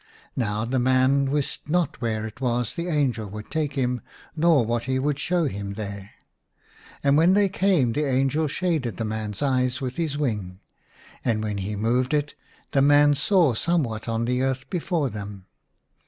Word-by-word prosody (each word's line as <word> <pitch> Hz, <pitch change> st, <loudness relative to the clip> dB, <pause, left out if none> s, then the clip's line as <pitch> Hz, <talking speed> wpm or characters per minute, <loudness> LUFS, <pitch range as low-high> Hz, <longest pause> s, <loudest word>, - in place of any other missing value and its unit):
Now 110 Hz, -3 st, -1 dB
the 130 Hz, +2 st, 0 dB
man 130 Hz, +2 st, +3 dB
wist 145 Hz, +1 st, -2 dB
not 175 Hz, -2 st, 0 dB
where 110 Hz, -2 st, -1 dB
it 110 Hz, +4 st, -9 dB
was 120 Hz, -3 st, 0 dB
the 170 Hz, +1 st, -4 dB
angel 130 Hz, -10 st, 0 dB
would 105 Hz, +1 st, -9 dB
take 155 Hz, -3 st, -1 dB
him 125 Hz, -3 st, -1 dB, 0.3 s
nor 160 Hz, -6 st, +4 dB
what 120 Hz, +1 st, -1 dB
he 130 Hz, 0 st, 0 dB
would 145 Hz, +1 st, -1 dB
show 175 Hz, +4 st, +1 dB
him 100 Hz, -6 st, -4 dB
there. 100 Hz, -1 st, -6 dB, 0.9 s
And 140 Hz, 0 st, +4 dB
when 170 Hz, +4 st, +5 dB
they 205 Hz, -1 st, +4 dB
came 190 Hz, -, -11 dB
lo8 -, -, -12 dB
IN 195 Hz, -, +4 dB
A 190 Hz, -, +4 dB
RUINED 125 Hz, -5 st, +2 dB
CHAPEL. 150 Hz, -, 0 dB
the 130 Hz, -, +2 dB
angel 135 Hz, +4 st, +1 dB
shaded 155 Hz, -6 st, -1 dB
the 115 Hz, -, -2 dB
man's 110 Hz, 0 st, -4 dB
eyes 130 Hz, -2 st, +1 dB
with 130 Hz, -1 st, -4 dB
his 160 Hz, -4 st, -1 dB
wing, 105 Hz, -10 st, -2 dB, 0.6 s
and 110 Hz, -3 st, 0 dB
when 105 Hz, -2 st, -2 dB
he 100 Hz, +2 st, -3 dB
moved 125 Hz, +6 st, +1 dB
it 150 Hz, 0 st, -1 dB, 0.4 s
the 140 Hz, -, +3 dB
man 145 Hz, +1 st, +6 dB
saw 155 Hz, 0 st, +3 dB
somewhat 115 Hz, -5 st, -1 dB
on 115 Hz, 0 st, 0 dB
the 125 Hz, +1 st, 0 dB
earth 130 Hz, 0 st, -1 dB
before 170 Hz, -6 st, -1 dB
them. 100 Hz, -2 st, -7 dB
130 Hz, 195 wpm, -24 LUFS, 110-150 Hz, 0.9 s, man